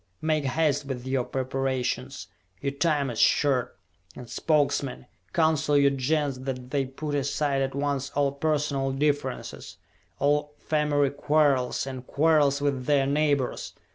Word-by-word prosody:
Make 155 Hz, -2 st, +1 dB
haste 145 Hz, 0 st, +1 dB
with 130 Hz, -2 st, -5 dB
your 130 Hz, -1 st, 0 dB
preparations! 130 Hz, -3 st, -2 dB, 0.3 s
Your 140 Hz, -, -2 dB
time 145 Hz, -2 st, 0 dB
is 115 Hz, -, -5 dB
short! 135 Hz, -4 st, +2 dB, 0.4 s
And 125 Hz, -, -9 dB
Spokesmen, 140 Hz, -, 0 dB, 0.3 s
counsel 155 Hz, -3 st, +2 dB
your 140 Hz, -1 st, +5 dB
Gens 140 Hz, 0 st, 0 dB
that 130 Hz, -1 st, -5 dB
they 140 Hz, -2 st, 0 dB
put 145 Hz, +3 st, -5 dB
aside 140 Hz, 0 st, 0 dB
at 135 Hz, 0 st, -2 dB
once 140 Hz, -1 st, -1 dB
all 140 Hz, -1 st, +2 dB
personal 140 Hz, -2 st, -1 dB
differences, 145 Hz, -1 st, -2 dB, 0.4 s
all 150 Hz, +2 st, +1 dB
family 145 Hz, -2 st, +1 dB
quarrels, 140 Hz, -4 st, +1 dB
all 130 Hz, -2 st, -6 dB
quarrels 145 Hz, 0 st, +2 dB
with 135 Hz, -3 st, -1 dB
their 140 Hz, -2 st, +3 dB
neighbors! 140 Hz, -2 st, 0 dB
140 Hz, 135 wpm, -26 LUFS, 135-150 Hz, 0.4 s, your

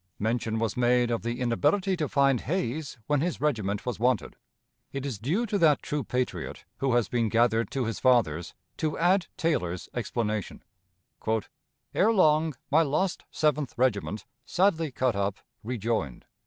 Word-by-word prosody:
Mention 110 Hz, +1 st, -1 dB
was 115 Hz, -1 st, -1 dB
made 120 Hz, 0 st, +3 dB
of 115 Hz, -, 0 dB
the 120 Hz, +2 st, -3 dB
inability 145 Hz, -, +1 dB
to 155 Hz, -5 st, -2 dB
find 140 Hz, -3 st, +3 dB
Hayes 155 Hz, -3 st, -2 dB
when 145 Hz, +1 st, +1 dB
his 175 Hz, +1 st, -1 dB
regiment 105 Hz, -9 st, -1 dB
was 125 Hz, -4 st, -3 dB
wanted. 125 Hz, -4 st, +1 dB, 0.6 s
It 135 Hz, 0 st, -4 dB
is 130 Hz, -8 st, -4 dB
due 170 Hz, -, 0 dB
to 205 Hz, -2 st, -1 dB
that 155 Hz, -5 st, +4 dB
true 145 Hz, -1 st, -2 dB
patriot, 125 Hz, +2 st, -3 dB
who 135 Hz, -2 st, 0 dB
has 120 Hz, -5 st, +2 dB
been 115 Hz, -2 st, 0 dB
gathered 115 Hz, 0 st, +2 dB
to 130 Hz, -3 st, -1 dB
his 115 Hz, -1 st, -3 dB
fathers, 95 Hz, -11 st, +2 dB, 0.2 s
to 155 Hz, -2 st, -1 dB
add 180 Hz, +2 st, +3 dB
Taylor's 90 Hz, -, -1 dB
explanation: 110 Hz, -4 st, -3 dB, 1.3 s
"Ere 215 Hz, +4 st, +4 dB
long 155 Hz, -, +3 dB, 0.2 s
my 155 Hz, +3 st, +6 dB
lost 165 Hz, +5 st, 0 dB
Seventh 150 Hz, -3 st, 0 dB
Regiment, 110 Hz, -4 st, 0 dB, 0.2 s
sadly 165 Hz, -1 st, +1 dB
cut 125 Hz, -3 st, 0 dB
up, 100 Hz, 0 st, -1 dB, 0.3 s
rejoined. 110 Hz, -, -2 dB
125 Hz, 155 wpm, -28 LUFS, 115-155 Hz, 1.3 s, my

